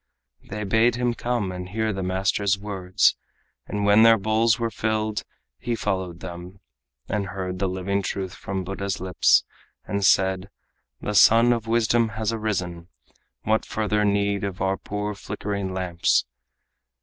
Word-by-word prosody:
They 105 +1 -4
bade 110 +4 +3
him 120 0 0
come 120 -5 -2
and 90 0 -6
hear 110 +2 -1
the 95 - -4
master's 95 +2 +1
words, 95 -3 +1 0.5
And 105 0 -2
when 105 +2 +6
their 115 0 +7
bowls 110 +2 +2
were 115 -1 -2
filled, 110 0 -1 0.4
he 120 0 -2
followed 95 -6 -3
them, 90 +2 -8 0.5
And 100 -2 -2
heard 95 -2 -5
the 95 -1 0
living 95 +2 -1
truth 95 -2 -4
from 95 -1 -4
Buddha's 95 +1 -3
lips, 90 -2 +3 0.4
And 100 0 -2
said: 95 0 +3 0.5
"The 105 - -3
sun 115 +3 +6
of 115 -1 -4
wisdom 115 0 +2
has 110 0 -1
arisen. 90 -6 -3 0.6
What 110 0 +1
further 105 -1 0
need 100 -1 +1
of 100 -1 -4
our 95 0 +1
poor 105 +1 -4
flickering 100 -1 -4
lamps?" 90 -2 +1
100 Hz, 150 wpm, -24 LUFS, 95-110 Hz, 0.6 s, their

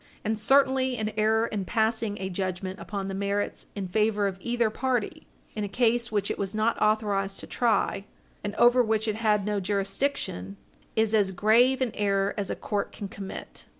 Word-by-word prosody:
And 220 0 0
certainly 265 +1 +3
an 215 -1 -2
error 220 +1 +3
in 210 -4 -3
passing 220 +1 0
a 190 - -3
judgment 185 0 -3
upon 200 -2 -4
the 195 - -4
merits 200 +1 -2
in 195 -2 -3
favor 210 +2 +1
of 190 -1 -2
either 235 -1 +1
party, 250 -2 -2 0.3
in 210 - -2
a - - -1
case 235 +2 +1
which 205 -2 0
it - - -4
was 200 +1 -3
not 220 +2 +2
authorized 205 -2 +1
to - - -8
try, 225 -4 0 0.4
and 205 0 -4
over 240 +1 +6
which 220 -1 0
it 215 -1 -1
had 210 -3 +2
no 210 -1 0
jurisdiction, 195 - -2 0.4
is 220 0 +2
as 205 -3 +3
grave 235 +7 +4
an 250 -3 +1
error 200 -1 +1
as 200 -2 -2
a - - -1
court 205 -2 -3
can 200 - -7
commit. 195 -2 -8
210 Hz, 185 wpm, -27 LUFS, 195-225 Hz, 0.4 s, over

